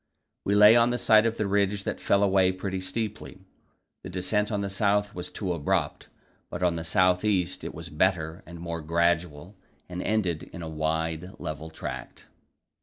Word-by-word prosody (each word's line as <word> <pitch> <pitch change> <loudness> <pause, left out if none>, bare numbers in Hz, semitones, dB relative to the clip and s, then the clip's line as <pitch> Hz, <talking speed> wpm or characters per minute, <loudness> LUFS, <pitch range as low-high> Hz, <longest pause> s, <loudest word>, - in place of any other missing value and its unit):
We 100 - +2
lay 105 +2 +8
on 120 0 +5
the 120 - 0
side 110 -1 +5
of 115 - -3
a 105 - +1
ridge 100 0 +1
that - - -3
fell 100 0 +2
away 95 -2 +4
pretty 95 0 -4
steeply. 105 0 -5 0.6
The - - -8
descent 100 +4 0
on 100 -1 -1
the 100 - -2
south 105 +1 +1
was 90 - -6
too 95 -4 -3
abrupt, 75 -4 -1 0.4
but - - -5
on 90 -2 +2
the 80 - -4
south 90 +2 +3
east 95 -4 0
it - - -6
was - - -8
better 80 +1 0
and 85 -1 -10
more 85 -1 -5
gradual, 85 +2 0 0.3
and 90 0 -5
ended 95 -7 -1
in 85 - -8
a - - -5
wide, 80 +3 -2
level 75 +1 -6
tract. 80 - -7
95 Hz, 180 wpm, -27 LUFS, 85-105 Hz, 0.6 s, lay